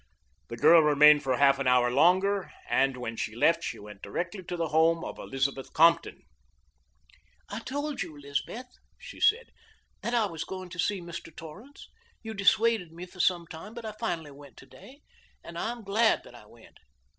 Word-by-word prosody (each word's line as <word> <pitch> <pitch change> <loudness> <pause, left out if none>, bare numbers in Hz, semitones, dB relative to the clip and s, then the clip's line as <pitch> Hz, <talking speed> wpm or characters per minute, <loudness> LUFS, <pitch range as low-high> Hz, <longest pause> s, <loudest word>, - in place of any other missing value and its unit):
The 115 - -7
girl 165 +7 +7
remained 150 0 +6
for 130 -3 -1
half 140 -1 +4
an 135 - -1
hour 125 -1 +3
longer, 185 +7 +2 0.2
and 135 -1 +1
when 120 -2 -5
she 110 -1 -4
left 165 +7 +2
she - - -4
went 105 -1 -12
directly 175 - -4
to 175 - -5
the 165 -2 -2
home 165 +2 +3
of - - -7
Elizabeth 135 0 -3
Compton. 165 +2 +3 1.3
"I - - -5
told 285 +2 -4
you, 170 -4 -6
Elizabeth," 140 - -5 0.3
she - - -12
said, 465 +3 +2 0.5
"that 235 - -2
I 230 -2 +3
was 165 -5 -5
going 185 -1 -8
to 180 0 -10
see 200 -1 0
Mr. 170 -1 -9
Torrance. 200 - -12 0.4
You 220 0 -6
dissuaded 200 -2 +2
me 170 +2 -9
for 185 +1 -17
some 175 -1 +2
time, 165 +8 -10
but 235 -1 -8
I 220 - -4
finally 175 -9 -4
went 140 0 -15
today, 280 +3 -16 0.4
and 170 - -11
I 220 +7 -2
am 240 -1 -9
glad 215 +3 +2
that - - -15
I - - -15
went. - - -19
170 Hz, 185 wpm, -28 LUFS, 140-205 Hz, 1.3 s, girl